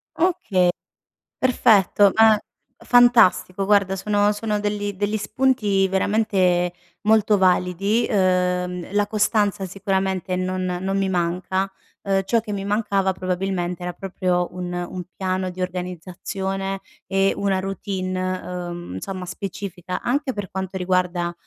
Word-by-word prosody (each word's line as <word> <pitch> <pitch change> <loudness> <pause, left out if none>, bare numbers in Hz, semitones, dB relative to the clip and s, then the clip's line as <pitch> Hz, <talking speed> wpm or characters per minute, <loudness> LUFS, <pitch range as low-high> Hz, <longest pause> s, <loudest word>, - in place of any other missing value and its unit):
Oka 210 - +2 0.7
perfetto. 205 -5 +4
Ah 220 -1 +6 0.5
fantastico 230 -6 +5
guarda 200 -1 +3
sono 205 +1 +1
sono 210 0 -2
degli 205 -1 -2
degli 205 +2 -1
spunti 210 -4 +1
veramente 190 -3 +1 0.3
molto 215 -1 +4
validi. 190 +4 +2
Uhm, 180 -2 0
la 205 0 +2
costanza 210 -2 +1
sicuramente 190 -1 -1
non 185 0 -2 0.2
non 195 +1 -1
mi 195 -1 +1
manca. 185 +2 -1 0.3
Uhm, 195 -1 +1
ciò 230 +3 +2
che 220 -1 -9
mi 195 -1 -3
mancava 200 -2 +1
probabilmente 180 -1 -2
era 180 0 -3
proprio 180 -1 -1
un 180 0 -5
un 175 0 -4
piano 185 -1 -1
di 180 +1 -9
organizzazione 185 +2 -4 0.3
e 195 0 +2
una 195 -2 0
routine, 185 -1 -3 0.3
uhm, 175 - -7
insomma 185 - -5
specifica 190 -1 -5
anche 270 +2 0
per 205 -3 -6
quanto 190 -1 -4
riguarda, 180 -1 0
190 Hz, 125 wpm, -22 LUFS, 180-205 Hz, 0.7 s, Ah